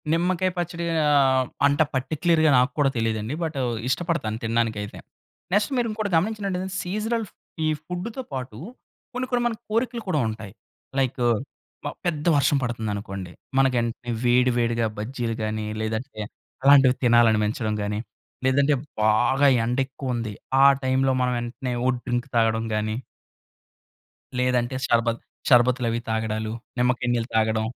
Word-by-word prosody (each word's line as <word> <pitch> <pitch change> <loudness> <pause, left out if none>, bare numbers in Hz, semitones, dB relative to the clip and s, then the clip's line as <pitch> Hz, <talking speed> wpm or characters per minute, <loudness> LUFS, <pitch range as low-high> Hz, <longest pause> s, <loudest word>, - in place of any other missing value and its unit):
నిమ్మకాయ 180 +2 +1
పచ్చడి 170 0 -3 0.2
ఆహ్, 135 -3 +4 0.2
అంత 145 +2 +2
పార్టిక్యులర్‌గా 155 +4 +2
నాక్కూడా 135 +3 +2
తెలీదండి. 110 +1 -1
బటు 155 -4 -2 0.3
ఇష్టపడతాను 165 -8 -1
తిండానికైతే. 115 -3 -1 0.5
నెక్స్ట్ 205 +5 +2
మీరు 240 -1 +1
ఇంకోటి 215 -2 -3
గమనించినట్టయితె, 195 -1 -1
సీజనల్ 215 +5 -2 0.4
ఈ - - +2 0.2
ఫుడ్‌తో 180 +9 -5
పాటు 125 -4 -5 0.6
కొన్ని, 255 +1 -2
కొన్ని 245 -1 +1
మనకు 230 -1 -4
కోరికలు 230 +1 -1
కూడా 155 -5 +2
ఉంటాయి. 110 -2 -7 0.5
లైకు 130 -1 0 0.6
మ - - -1 0.2
పెద్ద 155 -4 -1
వర్షం 140 +1 +3
పడుతుందనుకోండి, 105 -6 -4 0.3
మనకేంటనే 120 -2 +1
వేడి, 125 +1 +4
వేడిగా 115 -1 +1
బజ్జీలు 115 +1 -3
గాని, 110 0 -2 0.2
లేదంటే 110 +2 -4 0.4
అలాంటివి 135 -2 +7
తినాలనిపించటం 110 -1 +3
గాని, 105 +1 -2 0.5
లేదంటే 140 +2 +3 0.3
బాగా 120 +6 +4 0.2
ఎండ 120 +2 -1
ఎక్కువ 130 -1 -4
ఉంది, 115 -3 -3 0.3
ఆ - - +8 0.2
టైం‌లో 130 0 +2
మనం 125 0 +1
వెంటనే 125 +2 -4
ఓహ్! 130 0 +3
డ్రింక్ 120 +1 -1
తాగడం 115 -1 +2
గాని 110 0 -1 1.4
లేదంటే 125 0 +1
షర్బత్ 115 0 +1 0.3
షర్బతులు 125 0 +4
అవి 115 - -1
తాగడాలు, 110 0 -2 0.3
నిమ్మకాయ 125 0 +1
నీళ్ళు 120 -1 -1
తాగడం. 110 0 +2
125 Hz, 125 wpm, -24 LUFS, 115-150 Hz, 1.4 s, ఆ